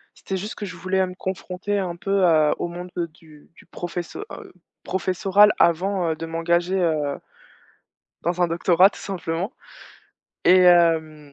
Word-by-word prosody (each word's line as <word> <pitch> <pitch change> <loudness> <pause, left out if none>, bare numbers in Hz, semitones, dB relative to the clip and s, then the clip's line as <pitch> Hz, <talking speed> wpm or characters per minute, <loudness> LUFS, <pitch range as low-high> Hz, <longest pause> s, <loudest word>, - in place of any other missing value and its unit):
C'était 190 - -5
juste 205 +4 -6
que 205 - -6
je 180 -2 -8
voulais, 185 +3 -1
heu, 185 - +1
me 180 - -9
confronter 190 +2 -4
un 180 -3 -3
peu, 195 +2 0
heu, 155 -3 +4
au - - -2
monde 175 +1 -8 0.2
du 155 -2 -19
du - - -18
professo 175 -1 -6
heu, - - -10 0.3
professoral 190 +3 +3
avant, 175 +1 +2
heu, - - -2
de 165 - -6
m'engager 170 +3 0
heu 155 -5 0 1.0
dans 175 +2 -1
un 175 - +4
doctorat 175 +2 +4
tout - - -13
simplement 180 0 -4 0.9
et 185 +1 +6
hem, 160 -4 +3
175 Hz, 160 wpm, -23 LUFS, 165-190 Hz, 1.0 s, et